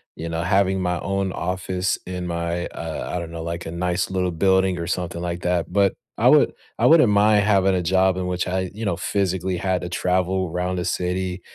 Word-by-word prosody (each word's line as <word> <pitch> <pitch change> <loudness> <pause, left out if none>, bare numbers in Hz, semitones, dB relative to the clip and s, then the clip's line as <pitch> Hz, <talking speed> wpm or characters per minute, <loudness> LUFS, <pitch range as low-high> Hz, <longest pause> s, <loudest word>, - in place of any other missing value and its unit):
you 85 +1 -5
know, 80 0 -2
having 95 0 +2
my 90 -1 -1
own 95 -1 -1
office 90 +1 -2
in 90 -1 -5
my, 85 0 -2
uh 80 -1 -6
I - - -1
don't 85 -1 -6
know, 85 -1 -6
like, 85 +1 -5
a 80 - -5
nice 90 +1 -1
little 90 -1 0
building 95 +2 +2
or 85 - -4
something 90 -1 -3
like 85 0 -3
that, 90 -1 0
but 100 -1 +3 0.2
I - - +4
would - - +5 0.3
I - - +3
wouldn't 155 -9 +6
mind 105 0 +4
having 95 -2 +3
a 90 - +1
job 95 +1 +2
in 90 -1 -2
which 90 0 -2
I, 95 0 -1
you 110 +1 -5
know, 90 - 0
physically 95 -1 -1
had 95 0 -1
to 90 - -4
travel 90 0 0
'round 90 +1 -2
the 90 - -3
city, 90 0 -2
90 Hz, 220 wpm, -22 LUFS, 85-95 Hz, 0.3 s, wouldn't